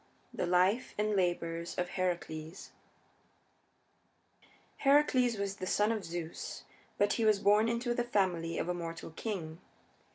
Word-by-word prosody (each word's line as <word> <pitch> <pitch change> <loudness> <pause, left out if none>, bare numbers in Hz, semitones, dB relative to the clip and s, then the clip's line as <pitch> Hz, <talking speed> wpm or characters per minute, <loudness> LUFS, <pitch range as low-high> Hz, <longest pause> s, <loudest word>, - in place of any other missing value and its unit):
THE - - -2
LIFE 185 +7 +2
AND 210 0 +1
LABORS 170 -2 -1
OF 180 0 -1
HERACLES 175 -2 -3 1.7
I - - -25 0.3
Heracles 275 -4 +4
was 200 0 -3
the 185 - -5
son 210 +3 +2
of 220 -3 -2
Zeus, 165 -1 -6 0.3
but 205 - +3
he 230 - 0
was 215 -2 +5
born 210 +3 +4
into 240 +1 0
the 240 - 0
family 180 -7 0
of - - -1
a 180 - 0
mortal 165 -1 -6
king. 165 -3 -5
190 Hz, 140 wpm, -32 LUFS, 170-220 Hz, 1.7 s, was